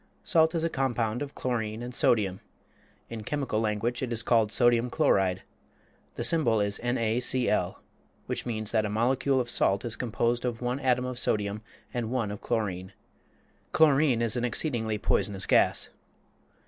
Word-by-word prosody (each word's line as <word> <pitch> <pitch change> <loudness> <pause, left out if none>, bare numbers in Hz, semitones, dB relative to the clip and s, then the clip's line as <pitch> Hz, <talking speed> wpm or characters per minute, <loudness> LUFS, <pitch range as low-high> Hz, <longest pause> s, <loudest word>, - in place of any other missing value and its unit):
Salt 160 -1 +3
is 165 - 0
a - - +2
compound 120 -6 -1
of 145 -1 -6
chlorine 115 -2 -3
and 125 +1 -6
sodium. 100 -6 +2 0.7
In 115 -1 -7
chemical 135 -3 -2
language 110 +2 -1
it 130 -2 -3
is 115 -1 -1
called 115 -3 +2
sodium 120 0 +3
chloride. 95 -5 +1 0.7
The - - -3
symbol 130 -10 +3
is 100 0 0
NaCl, 120 +1 0 0.5
which - - -3
means 110 -3 -3
that 110 -2 +2
a 105 - -2
molecule 130 +5 +1
of 125 - -1
salt 100 -3 +1
is 115 -2 -2
composed 120 0 -1
of 120 -2 -2
one 125 +2 -2
atom 125 -2 +1
of 125 -1 -4
sodium 105 -2 -1 0.3
and 120 -3 -2
one 120 -5 -1
of 105 - -7
chlorine. 95 -5 -2 0.8
Chlorine 140 -6 +4
is 115 -1 0
an 120 - -1
exceedingly 115 -3 -1
poisonous 100 -1 0
gas. - - +2
120 Hz, 160 wpm, -28 LUFS, 110-125 Hz, 0.8 s, Chlorine